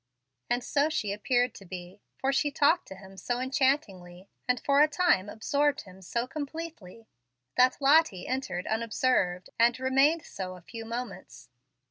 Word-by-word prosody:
And 245 Hz, 0 st, 0 dB
so 290 Hz, +3 st, +1 dB
she 210 Hz, -10 st, -1 dB
appeared 245 Hz, +2 st, +1 dB
to -, -, -12 dB
be, 180 Hz, +1 st, -9 dB, 0.2 s
for 270 Hz, +1 st, 0 dB
she 290 Hz, +2 st, +2 dB
talked 295 Hz, +4 st, +2 dB
to 190 Hz, -, -9 dB
him 190 Hz, 0 st, -14 dB
so 240 Hz, +6 st, -2 dB
enchantingly, 255 Hz, -, -1 dB, 0.2 s
and 250 Hz, -1 st, +2 dB
for 280 Hz, +3 st, +3 dB
a 300 Hz, -, +7 dB
time 295 Hz, -, +2 dB
absorbed 285 Hz, +7 st, 0 dB
him 190 Hz, -1 st, -15 dB
so 235 Hz, +6 st, -2 dB
completely, 285 Hz, -, -7 dB, 0.5 s
that 255 Hz, +1 st, +4 dB
Lottie 280 Hz, -, +4 dB
entered 255 Hz, -9 st, -3 dB
unobserved, 220 Hz, -5 st, 0 dB
and 235 Hz, +2 st, +4 dB
remained 275 Hz, +5 st, +3 dB
so 185 Hz, -1 st, -6 dB
a 180 Hz, -, -13 dB
few 225 Hz, +5 st, -9 dB
moments. 230 Hz, -, -7 dB
245 Hz, 155 wpm, -28 LUFS, 195-280 Hz, 0.5 s, a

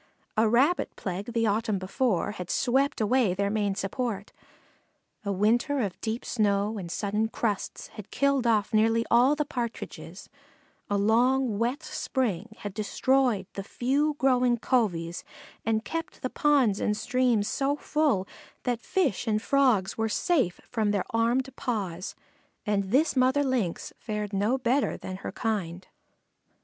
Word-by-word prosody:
A 220 Hz, 0 st, +3 dB
Rabbit 270 Hz, +10 st, +2 dB
plague 195 Hz, +4 st, -4 dB
the 230 Hz, -1 st, +1 dB
autumn 215 Hz, 0 st, +1 dB
before 195 Hz, +2 st, 0 dB
had 180 Hz, -4 st, -7 dB
swept 270 Hz, +3 st, +1 dB
away 220 Hz, -3 st, +2 dB
their 200 Hz, +1 st, 0 dB
main 205 Hz, -2 st, 0 dB
support; 200 Hz, 0 st, -3 dB, 0.9 s
a 200 Hz, -, -2 dB
winter 230 Hz, +9 st, +2 dB
of 200 Hz, -5 st, -3 dB
deep 225 Hz, +1 st, -3 dB
snow 210 Hz, -1 st, +1 dB
and 170 Hz, -3 st, -6 dB
sudden 210 Hz, +3 st, 0 dB
crusts 220 Hz, -2 st, -3 dB
had 210 Hz, -1 st, -10 dB
killed 275 Hz, -3 st, +1 dB
off 220 Hz, 0 st, +2 dB
nearly 225 Hz, +1 st, +3 dB
all 250 Hz, +5 st, +5 dB
the 300 Hz, 0 st, -1 dB
Partridges; 245 Hz, -5 st, -6 dB, 0.6 s
a 205 Hz, -, +1 dB
long 235 Hz, +2 st, +2 dB
wet 250 Hz, +7 st, -1 dB
spring 220 Hz, -, -2 dB
had 205 Hz, -2 st, -5 dB
destroyed 225 Hz, +1 st, +1 dB
the 195 Hz, -, -4 dB
few 280 Hz, +8 st, 0 dB
growing 250 Hz, -4 st, +3 dB
coveys 175 Hz, -9 st, 0 dB, 0.4 s
and 225 Hz, -, +3 dB
had -, -, -35 dB
kept 330 Hz, 0 st, -5 dB
the 255 Hz, -, -2 dB
ponds 270 Hz, -9 st, +3 dB
and 210 Hz, -, 0 dB
streams 245 Hz, -2 st, +1 dB
so 275 Hz, +1 st, 0 dB
full 295 Hz, -11 st, 0 dB, 0.4 s
that 245 Hz, -2 st, -1 dB
Fish 310 Hz, -, 0 dB
and 215 Hz, -1 st, +2 dB
Frogs 240 Hz, -6 st, +2 dB
were 225 Hz, 0 st, +1 dB
safe 260 Hz, -, +1 dB
from 220 Hz, -4 st, +1 dB
their 205 Hz, -2 st, 0 dB
armed 245 Hz, +3 st, +1 dB
paws, 190 Hz, -7 st, -3 dB, 0.5 s
and 205 Hz, -1 st, +1 dB
this 275 Hz, +12 st, +2 dB
mother 260 Hz, +2 st, +3 dB
Lynx 245 Hz, -11 st, -1 dB
fared 210 Hz, -2 st, -4 dB
no 210 Hz, +6 st, +1 dB
better 260 Hz, +2 st, +1 dB
than 185 Hz, 0 st, -6 dB
her -, -, -6 dB
kind. 185 Hz, -6 st, -3 dB
225 Hz, 150 wpm, -27 LUFS, 205-260 Hz, 0.9 s, all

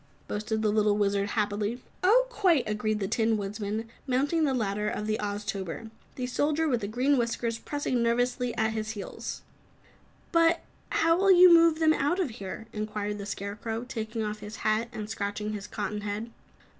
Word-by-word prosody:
boasted 215 Hz, +1 st, -2 dB
the 210 Hz, -, +3 dB
little 210 Hz, -1 st, +3 dB
Wizard, 200 Hz, -1 st, +1 dB
happily. 210 Hz, +2 st, -1 dB, 0.2 s
"Oh, 470 Hz, +7 st, +6 dB
quite!" 370 Hz, -, +2 dB
agreed 215 Hz, 0 st, -1 dB
the 195 Hz, -, -1 dB
Tin 225 Hz, +1 st, +2 dB
Woodman, 210 Hz, +2 st, -3 dB, 0.2 s
mounting 285 Hz, +5 st, +2 dB
the 275 Hz, -, +1 dB
ladder 210 Hz, -2 st, 0 dB
of 210 Hz, -, -3 dB
the 215 Hz, 0 st, -1 dB
Oztober, 205 Hz, 0 st, -4 dB, 0.2 s
the 255 Hz, -, -3 dB
Soldier 300 Hz, +5 st, +1 dB
with 235 Hz, -8 st, 0 dB
Green 260 Hz, +4 st, +2 dB
Whiskers 230 Hz, -1 st, -1 dB
pressing 290 Hz, -4 st, -1 dB
nervously 245 Hz, +1 st, +1 dB
at 220 Hz, 0 st, +2 dB
his 215 Hz, -1 st, -3 dB
heels. 200 Hz, -, -6 dB, 0.9 s
"But 335 Hz, 0 st, +4 dB, 0.3 s
how 330 Hz, 0 st, +3 dB
will 390 Hz, +1 st, +5 dB
you 360 Hz, -1 st, +9 dB
move 335 Hz, -1 st, +6 dB
them 315 Hz, -1 st, +4 dB
out 305 Hz, +6 st, +1 dB
of 335 Hz, -10 st, 0 dB
here?" 200 Hz, +1 st, -7 dB
inquired 210 Hz, -1 st, -3 dB
the 200 Hz, -, -6 dB
Scarecrow, 210 Hz, +3 st, -4 dB
taking 225 Hz, -3 st, -4 dB
off 210 Hz, 0 st, -3 dB
his 210 Hz, +1 st, -8 dB
hat 215 Hz, +2 st, +2 dB
and 210 Hz, -1 st, -5 dB
scratching 210 Hz, 0 st, -3 dB
his 205 Hz, -1 st, -5 dB
cotton 210 Hz, -1 st, -3 dB
head. 210 Hz, +3 st, -4 dB
220 Hz, 170 wpm, -28 LUFS, 210-260 Hz, 0.9 s, you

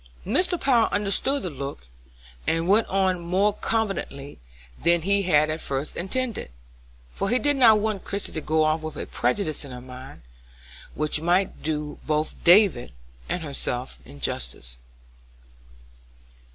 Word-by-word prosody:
Mr. 350 Hz, -, +1 dB
Power 240 Hz, -5 st, +3 dB
understood 210 Hz, +7 st, +1 dB
the 180 Hz, -, -3 dB
look, 140 Hz, -, -7 dB, 0.6 s
and 165 Hz, +1 st, +1 dB
went 210 Hz, +4 st, +4 dB
on 190 Hz, -2 st, +1 dB
more 185 Hz, +5 st, +1 dB
confidentially 195 Hz, -11 st, -2 dB, 0.4 s
than 170 Hz, 0 st, +4 dB
he 200 Hz, +2 st, +2 dB
had 155 Hz, -4 st, +3 dB
at 155 Hz, -, -3 dB
first 135 Hz, +2 st, -3 dB
intended, 235 Hz, -, -2 dB, 0.6 s
for 195 Hz, -, -1 dB
he 245 Hz, -, +4 dB
did 290 Hz, +2 st, +2 dB
not 230 Hz, -5 st, +7 dB
want 210 Hz, -2 st, -2 dB
Christie 200 Hz, 0 st, -4 dB
to 160 Hz, -, -4 dB
go 155 Hz, +1 st, +2 dB
off 155 Hz, +1 st, +1 dB
with 155 Hz, -2 st, -6 dB
a -, -, -4 dB
prejudice 155 Hz, +5 st, -1 dB
in 140 Hz, -, -9 dB
her 125 Hz, -1 st, -7 dB
mind 130 Hz, -, -11 dB, 0.7 s
which 150 Hz, 0 st, 0 dB
might 180 Hz, +3 st, +1 dB
do 150 Hz, -1 st, -3 dB
both 155 Hz, 0 st, -1 dB
David 175 Hz, -, +5 dB, 0.4 s
and 180 Hz, -, -2 dB
herself 130 Hz, -3 st, -3 dB
injustice. 60 Hz, -3 st, -4 dB
170 Hz, 140 wpm, -25 LUFS, 145-205 Hz, 0.7 s, not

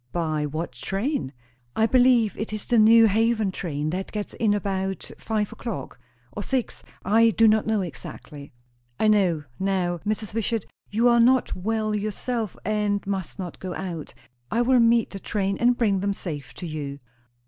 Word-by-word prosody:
"By 155 Hz, -3 st, -1 dB
what 155 Hz, +2 st, -4 dB
train?" 195 Hz, -, -2 dB, 0.4 s
"I 220 Hz, -, +3 dB
believe, 245 Hz, -3 st, +4 dB
it 215 Hz, -, -4 dB
is 215 Hz, -1 st, -4 dB
the 240 Hz, -2 st, +3 dB
New 225 Hz, +1 st, +7 dB
Haven 220 Hz, -1 st, +2 dB
train 155 Hz, -4 st, -3 dB
that 190 Hz, +2 st, -4 dB
gets 210 Hz, -1 st, -4 dB
in 220 Hz, -3 st, +1 dB
about 195 Hz, -2 st, -2 dB
five 215 Hz, -2 st, -1 dB
o'clock. 185 Hz, -, -6 dB, 0.3 s
Or 205 Hz, -, -5 dB
six. 255 Hz, +3 st, -2 dB, 0.2 s
I 225 Hz, +4 st, +5 dB
do 225 Hz, 0 st, +4 dB
not 215 Hz, 0 st, +3 dB
know 220 Hz, -2 st, +1 dB
exactly." 150 Hz, -4 st, -8 dB, 0.5 s
"I 220 Hz, -, +3 dB
know. 185 Hz, -7 st, +3 dB, 0.2 s
Now, 185 Hz, -3 st, 0 dB
Mrs. 215 Hz, +2 st, -3 dB
Wishart, 225 Hz, 0 st, -1 dB, 0.2 s
you 225 Hz, +4 st, +2 dB
are 235 Hz, -1 st, +5 dB
not 250 Hz, +2 st, +4 dB
well 215 Hz, +3 st, -1 dB
yourself, 215 Hz, +2 st, -3 dB
and 210 Hz, -1 st, 0 dB
must 195 Hz, -3 st, -4 dB
not 180 Hz, -4 st, -6 dB
go 185 Hz, -2 st, -5 dB
out. 170 Hz, -5 st, -6 dB, 0.3 s
I 235 Hz, -, +1 dB
will 255 Hz, +1 st, +4 dB
meet 230 Hz, -1 st, +4 dB
the 195 Hz, -, -6 dB
train 195 Hz, -1 st, -1 dB
and 245 Hz, 0 st, +3 dB
bring 205 Hz, -5 st, +2 dB
them 200 Hz, +1 st, 0 dB
safe 155 Hz, -7 st, -7 dB
to 180 Hz, -, -7 dB
you." 145 Hz, -3 st, -5 dB
205 Hz, 170 wpm, -25 LUFS, 185-225 Hz, 0.5 s, New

